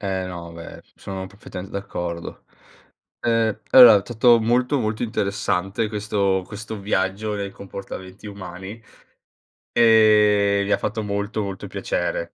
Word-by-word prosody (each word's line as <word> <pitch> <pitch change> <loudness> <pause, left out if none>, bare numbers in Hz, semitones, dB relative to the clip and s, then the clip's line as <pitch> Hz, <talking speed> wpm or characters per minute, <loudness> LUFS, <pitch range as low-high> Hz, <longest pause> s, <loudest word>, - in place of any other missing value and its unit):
Eh, 95 -2 -2
no, 85 -2 -8
beh, 85 0 -10
sono 95 -1 -7
perfettamente 95 -1 -10
d'accordo. 85 -3 -6 0.8
Eh, 115 -2 0
allo 120 -6 +9
tutto 120 +2 +4
molto, 125 +5 +1
molto 110 -2 -2
interessante, 100 -1 -1
questo 100 -3 -1
questo 110 +1 -7
viaggio 100 +2 -1
nei 100 -1 -4
comportamenti 95 0 -9
umani, 95 +2 -9 0.9
e 105 -3 +4
mi 100 - -3
ha - - +4
fatto 110 +1 -3
molto, 100 +1 -3
molto 95 -1 -6
piacere. - - -2
100 Hz, 120 wpm, -22 LUFS, 95-110 Hz, 0.9 s, allo